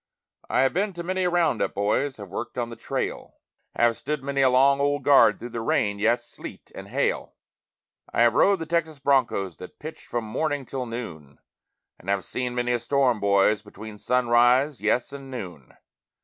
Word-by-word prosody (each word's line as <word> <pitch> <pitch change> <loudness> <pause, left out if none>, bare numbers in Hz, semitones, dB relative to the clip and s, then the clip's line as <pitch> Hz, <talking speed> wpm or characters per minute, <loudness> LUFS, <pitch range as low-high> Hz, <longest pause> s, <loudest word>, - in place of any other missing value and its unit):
I - - +3
have 135 - +2
been 195 +2 0
to 170 0 -6
many 185 +1 -1
a - - +3
round 165 -9 +1
up, - - -1
boys, 105 +8 0
have 100 -3 -9
worked 115 +6 -6
on 120 -1 -2
the - - -7
trail, - - -4 0.4
Have 120 -1 +3
stood 150 +3 -4
many 140 0 -1
a 130 - +5
long 135 +2 +4
old 145 0 0
guard 135 -6 +6
through 120 - -8
the 115 -1 -5
rain, 100 -2 0
yes, 120 +3 +1
sleet, - - -10
and - - -9
hail; - - -1 0.8
I 115 - +3
have 120 -1 +4
rode 195 +9 +4
the 165 - -5
Texas 160 -2 -1
broncos 130 - +1
that 90 - -11
pitched 155 +1 -9
from 120 -1 -2
morning 140 +5 -2
till 130 0 -5
noon, 85 - -7 0.6
And 95 - -9
have 100 -2 0
seen 125 -1 -3
many 120 0 0
a 120 - +1
storm, 125 -1 +1
boys, 100 +1 +3
between 105 0 -11
sunrise, 125 +2 +3
yes, 115 +5 0
and 135 -1 -9
noon. 90 - -8
125 Hz, 190 wpm, -25 LUFS, 110-140 Hz, 0.8 s, guard